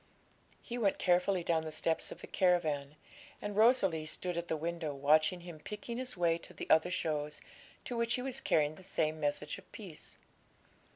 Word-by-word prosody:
He 240 0 -5
went 200 -4 +2
carefully 180 0 +2
down 165 -1 +1
the 155 - -5
steps 160 +1 +1
of - - -9
the - - -7
caravan, 155 -6 +1 0.4
and 205 -1 -4
Rosalie 200 -9 +4
stood 180 +3 -3
at 170 0 -3
the 160 - -1
window, 165 -2 -3
watching 155 +5 +3
him 170 -3 -9
picking 210 +7 -6
his 250 -4 -2
way 170 -1 +2
to - - -11
the - - -6
other 160 +2 +5
shows, 150 -4 -2 0.5
to 245 - -3
which 235 0 +1
he 250 - -3
was 265 0 -2
carrying 150 -1 +2
the 185 - -14
same 155 -3 0
message 145 -1 -1
of - - -20
peace. - - -10
170 Hz, 185 wpm, -33 LUFS, 155-200 Hz, 0.5 s, other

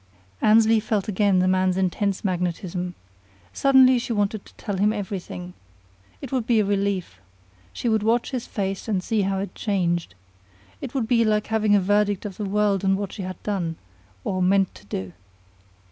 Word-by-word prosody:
Annesley 220 +1 +5
felt 215 -2 -1
again 200 -1 +2
the 185 0 +3
man's 185 0 +2
intense 190 +2 -1
magnetism. 180 0 -2 0.6
Suddenly 260 -2 +5
she 235 - -5
wanted 205 -1 -1
to - - -18
tell 205 -3 -4
him 205 +3 +3
everything. 190 -3 -5 0.7
It 270 - -6
would 250 -4 -1
be 235 -2 +4
a 210 - +2
relief. 200 -2 -1 0.5
She 240 - -4
would 220 -2 +2
watch 230 +3 +1
his 250 -3 -4
face 195 -1 -3
and 195 -4 0
see 220 +1 0
how 195 0 0
it 195 +1 -4
changed. 175 - -1 0.7
It 250 - -7
would 245 -5 0
be 230 0 +3
like 215 -1 +1
having 215 -1 +3
the 205 - +6
verdict 205 +1 +1
of 200 -3 -6
the 210 - -3
world 200 -1 +1
on 195 0 +3
what 200 -1 -4
she 205 - -6
had 185 0 -7
done 180 -6 -2 0.5
or 185 -1 -2
meant 195 +1 +3
to - - -16
do. 95 -3 -5
200 Hz, 180 wpm, -24 LUFS, 185-215 Hz, 0.7 s, the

